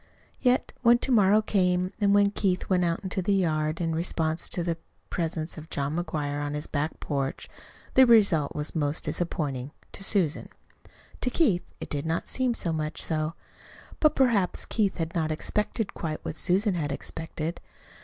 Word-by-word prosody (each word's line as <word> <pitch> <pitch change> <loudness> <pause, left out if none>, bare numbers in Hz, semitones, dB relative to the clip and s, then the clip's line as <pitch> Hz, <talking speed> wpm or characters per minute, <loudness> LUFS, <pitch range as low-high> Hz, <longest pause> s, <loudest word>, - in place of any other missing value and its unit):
Yet, 250 -1 +2
when 235 -1 +6
to 260 - -2
morrow 210 -2 +5
came, 180 -2 +1
and 200 -1 +4
when 200 0 +4
Keith 190 -3 0
went 180 -2 +2
out 170 -1 0
into 190 0 -2
the 195 +2 +2
yard 155 -4 0
in 165 -2 -1
response 160 -1 -1
to 175 - 0
the 165 -1 -2 0.3
presence 160 -1 -2
of 155 - -12
John 140 +2 -2
McGuire 145 -4 -2
on 145 0 -3
his 150 - -2
back 150 +2 -2
porch, 140 -2 -3 0.5
the 260 -1 +7
result 200 -11 +4
was 150 0 -3
most 150 -1 +1
disappointing 145 -7 -2 0.2
to 195 - -6
Susan. 185 -7 +2 0.7
To 250 - +1
Keith 235 - +2 0.2
it - - -8
did 145 +1 -2
not 165 +1 -1
seem 255 -2 +1
to - - -1
be - - -2
so 170 - 0
much 155 -1 -3
so. 155 0 -1 0.6
But 305 - +4
perhaps 230 -9 +2
Keith 205 -4 0
had 165 -1 -3
not 160 -3 0
expected 210 +6 -2
quite 155 -2 -5
what - - -3
Susan 195 +5 +2
had 150 -5 -2
expected. 160 +3 -4
170 Hz, 180 wpm, -27 LUFS, 155-200 Hz, 0.7 s, the